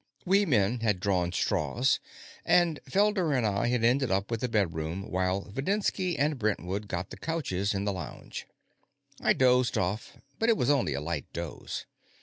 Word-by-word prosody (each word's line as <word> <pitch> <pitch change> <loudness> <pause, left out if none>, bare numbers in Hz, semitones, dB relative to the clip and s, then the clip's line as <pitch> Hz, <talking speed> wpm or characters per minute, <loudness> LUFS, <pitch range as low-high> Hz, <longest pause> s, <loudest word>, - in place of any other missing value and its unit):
We 195 +2 +4
men 115 -2 +2
had 105 -5 +1
drawn 90 -3 +1
straws, 125 +7 +1 0.4
and 170 -4 +3
Felder 195 -7 +2
and 120 - +1
I 100 +1 +1
had 120 -1 +1
ended 125 +2 +3
up 95 +3 0
with 115 -1 -1
the 125 - -1
bedroom 85 -4 -1
while 95 +1 0
Videnski 185 - 0
and 145 -1 +1
Brentwood 100 -1 -1
got 90 0 -4
the - - -8
couches 105 - -1
in 100 +1 -1
the 100 - 0
lounge. 85 -6 -7 0.7
I - - +4
dozed 125 -1 +3
off, 95 +4 -2 0.2
but 225 - +2
it 225 - +4
was 125 - +2
only 135 - +1
a 70 - -3
light 75 -1 -4
doze. 85 -2 -5
110 Hz, 170 wpm, -29 LUFS, 95-145 Hz, 0.7 s, We